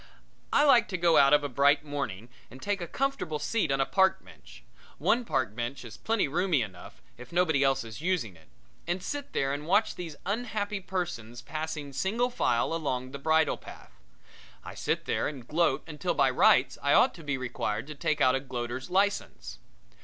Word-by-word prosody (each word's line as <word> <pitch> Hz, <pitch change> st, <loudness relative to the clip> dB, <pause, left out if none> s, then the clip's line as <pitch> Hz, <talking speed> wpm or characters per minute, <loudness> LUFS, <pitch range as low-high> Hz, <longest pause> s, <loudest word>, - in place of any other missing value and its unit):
I 290 Hz, -, +4 dB
like 240 Hz, -5 st, +5 dB
to 185 Hz, -, -3 dB
go 170 Hz, -1 st, +4 dB
out 140 Hz, 0 st, +6 dB
of 150 Hz, 0 st, +5 dB
a -, -, -1 dB
bright 140 Hz, +3 st, +3 dB
morning 120 Hz, -7 st, -4 dB, 0.2 s
and 130 Hz, -, -12 dB
take 200 Hz, +4 st, -2 dB
a 170 Hz, -, -4 dB
comfortable 270 Hz, -, -2 dB
seat 200 Hz, -1 st, -1 dB
on 135 Hz, -, +1 dB
a 135 Hz, -, +3 dB
park 190 Hz, +3 st, +2 dB
bench -, -, -16 dB, 0.3 s
one 245 Hz, -, +2 dB
park 105 Hz, -, -1 dB
bench 125 Hz, +2 st, -4 dB
is 115 Hz, -1 st, -9 dB
plenty 225 Hz, -6 st, 0 dB
roomy 165 Hz, -2 st, +1 dB
enough 95 Hz, -5 st, -11 dB, 0.2 s
if 125 Hz, -, -11 dB
nobody 165 Hz, -5 st, +2 dB
else 135 Hz, -2 st, +2 dB
is 115 Hz, +3 st, -9 dB
using 165 Hz, -, -1 dB
it 80 Hz, -1 st, -20 dB, 0.4 s
and 175 Hz, +1 st, -2 dB
sit 285 Hz, +8 st, -5 dB
there 135 Hz, 0 st, 0 dB
and 145 Hz, +2 st, -5 dB
watch 205 Hz, +5 st, +3 dB
these 165 Hz, -4 st, -7 dB
unhappy 210 Hz, -1 st, -2 dB
persons 155 Hz, -12 st, -5 dB
passing 155 Hz, 0 st, -5 dB
single 225 Hz, -, 0 dB
file 120 Hz, -, +1 dB
along 130 Hz, -6 st, -2 dB
the 140 Hz, -, -7 dB
bridle 160 Hz, +2 st, +2 dB
path. 65 Hz, -, -13 dB, 0.7 s
I -, -, -8 dB
sit -, -, -2 dB
there -, -, 0 dB
and 135 Hz, -5 st, -7 dB
gloat 150 Hz, -3 st, +1 dB
until 165 Hz, +3 st, -2 dB
by 135 Hz, -2 st, +3 dB
rights 125 Hz, 0 st, +4 dB
I 140 Hz, -, +2 dB
ought -, -, +5 dB
to 165 Hz, -, -12 dB
be 140 Hz, -2 st, -2 dB
required 115 Hz, -3 st, -3 dB
to 150 Hz, -, -8 dB
take 150 Hz, +1 st, -1 dB
out 130 Hz, -, +5 dB
a 135 Hz, -, +1 dB
gloater's 125 Hz, +1 st, -5 dB
license. 185 Hz, -, -1 dB
150 Hz, 195 wpm, -28 LUFS, 130-180 Hz, 0.7 s, out